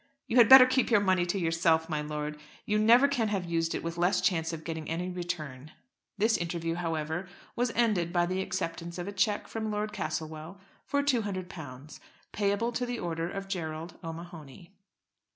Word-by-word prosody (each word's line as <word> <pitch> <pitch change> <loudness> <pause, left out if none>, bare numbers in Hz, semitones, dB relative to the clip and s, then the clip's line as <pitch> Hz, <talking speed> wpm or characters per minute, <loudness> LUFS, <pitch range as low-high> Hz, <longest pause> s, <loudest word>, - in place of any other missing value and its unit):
"You 235 - -1
had 235 -3 +7
better 265 -1 +11
keep 255 0 +1
your 230 -3 +5
money 185 -3 +2
to 175 - -1
yourself, 165 -2 +2
my 155 -3 -2
lord. 150 0 -4 0.3
You 210 0 +1
never 235 +6 +6
can 250 -6 0
have 200 -4 -1
used 165 -1 -1
it - - -4
with 170 +1 -4
less 180 +2 +3
chance 165 -4 +1
of 160 -1 -6
getting 160 -1 -5
any 175 +3 -2
return." 155 -6 -5 0.4
This 220 +3 +3
interview, 165 -1 -2
however, 165 +1 -3 0.3
was 245 0 0
ended 210 -8 +2
by 175 -1 +2
the 185 +2 -1
acceptance 170 -2 -4
of 175 +1 -5
a - - -3
cheque 205 +1 0
from 220 -1 -4
Lord 210 0 -2
Castlewell 160 +4 -5 0.3
for 285 0 +1
£200, 185 - -3 0.3
payable 205 +3 0
to 245 +1 -2
the 245 0 -3
order 165 -3 -3
of 195 +1 -6
Gerald 165 -3 -5
O'Mahony. 165 0 -9
175 Hz, 180 wpm, -29 LUFS, 165-205 Hz, 0.4 s, better